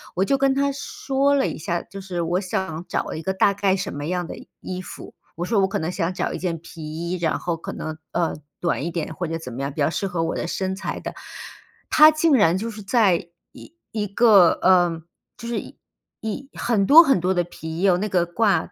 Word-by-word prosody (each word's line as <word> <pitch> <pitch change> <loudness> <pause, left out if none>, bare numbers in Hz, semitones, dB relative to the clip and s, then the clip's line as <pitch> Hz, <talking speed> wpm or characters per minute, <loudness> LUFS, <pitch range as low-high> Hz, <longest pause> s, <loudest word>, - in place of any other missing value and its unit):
我 185 - +2
就 275 +7 +2
跟 270 0 +3
他 280 +1 +1
说 275 0 -1
了 275 -1 +2
一 - - -4
下， 170 +2 -2
就 195 - -10
是 185 -2 -4
我 175 +2 0
想 180 -3 -3
找 - - -2
一 160 - -6
个 190 - -1
大 200 +1 +3
概 195 -1 +2
什 195 -3 -4
么 145 0 -4
样 175 +1 -2
的 - - -7
衣 - - -13
衣 185 -1 -5
服。 - - -10 0.2
我 170 - -4
说 210 +2 +1
我 190 - +3
可 200 +1 -2
能 160 +2 -2
想 180 -1 -1
找 - - -2
一 - - -3
件 170 -3 -3
皮 165 0 -11
衣， 165 +4 -4
然 165 -3 0
后 170 -2 -2
可 165 - -7
能， 155 0 -5
呃， 170 -1 0 0.2
短 140 - -1
一 170 - -3
点 160 -1 -4
或 175 +2 -3
者 165 +1 -3
怎 145 -6 -8
么 125 +3 -6
样 140 +1 -2
比 150 - -4
较 140 - +3
适 185 - -2
合 175 -3 -2
我 165 - -2
的 - - -2
身 190 +2 -2
材 195 - -4
的。 - - -7 0.8
他 305 0 +10
竟 310 0 +2
然 185 -9 +4
就 225 +4 -4
是 215 -1 -9
在 195 -5 +2 0.2
一 115 -1 -14 0.2
一 210 -2 -2
个 200 -4 +6
呃， 175 -3 +4 0.4
就 235 - -8
是 235 - -1
一 - - -11 0.4
一 220 +5 -5
很 215 -5 +1
多 325 +4 +10
很 270 - +3
多 180 +2 +1
的 175 - +2
皮 160 -2 -8
衣， - - -3
有 185 -3 +4
那 210 +3 -2
个 180 -3 +2
挂- 195 +3 +1
185 Hz, 265 characters per minute, -23 LUFS, 165-210 Hz, 0.8 s, 他